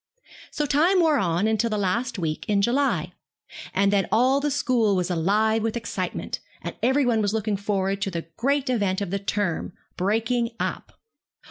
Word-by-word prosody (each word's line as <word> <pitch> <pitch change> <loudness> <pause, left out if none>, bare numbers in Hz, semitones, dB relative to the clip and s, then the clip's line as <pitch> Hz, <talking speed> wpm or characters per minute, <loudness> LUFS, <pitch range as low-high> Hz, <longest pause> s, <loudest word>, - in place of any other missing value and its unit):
So 300 - -2
the - - -1
time 345 +7 +4
wore 315 -5 +4
on 175 0 +1
until 220 +1 +1
the 215 - -1
last 230 +5 -1
week 160 -4 -2
in 200 -1 +2
July, 235 - +1 0.6
and 200 +1 +2
then 195 -1 +2
all 255 +5 +4
the 295 +1 0
school 245 -7 +2
was 180 0 -1
alive 210 +6 +2
with 225 +1 -1
excitement, 235 - -4 0.2
and - - -5
every 265 +3 +3
one 230 -3 +2
was 205 +1 0
looking 215 -1 0
forward 195 -1 -1
to 195 - 0
the 170 -3 -4
great 280 +2 0
event 205 -7 0
of 195 -3 -3
the 200 - -1
term, 195 -4 -2 0.2
'breaking 230 +4 0
up.' - - -4
215 Hz, 185 wpm, -24 LUFS, 195-245 Hz, 0.6 s, time